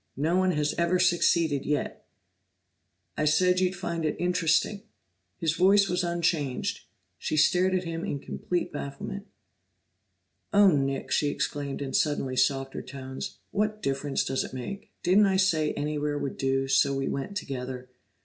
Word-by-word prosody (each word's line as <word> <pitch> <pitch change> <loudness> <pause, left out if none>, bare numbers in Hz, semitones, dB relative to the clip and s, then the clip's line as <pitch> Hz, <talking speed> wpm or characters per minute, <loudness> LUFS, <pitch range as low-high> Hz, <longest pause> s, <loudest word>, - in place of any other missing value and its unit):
No 160 +5 +1
one 185 0 +3
has 150 -1 0
ever 170 +2 +2
succeeded 170 -5 +2
yet!" 150 0 -3 1.1
"I 155 - 0
said 180 +4 +3
you'd 185 0 +1
find 170 -2 -3
it 155 - 0
interesting." 180 +3 +1 0.6
His 160 -2 0
voice 195 +3 +5
was 180 0 0
unchanged; 170 -6 -1 0.3
she 155 - -2
stared 185 +4 +4
at 185 - 0
him 165 0 -4
in - - -2
complete 175 +5 -3
bafflement. 170 +9 -6 1.2
"Oh, 200 -1 +6
Nick!" 135 -2 -1
she 145 - +2
exclaimed 145 -1 -3
in 135 -1 -5
suddenly 140 -4 0
softer 135 +1 0
tones. 130 0 -7
"What 215 +1 -1
difference 135 +1 0
does 130 0 -1
it - - -8
make? 195 +11 -7
Didn't 195 +4 +5
I 190 -1 +2
say 165 -5 +2
anywhere 150 0 -2
would 140 -2 -4
do, 135 0 +1
so 135 +1 +3
we 135 0 -1
went 140 +9 -3
together?" 130 -4 -5
155 Hz, 150 wpm, -27 LUFS, 135-180 Hz, 1.2 s, Oh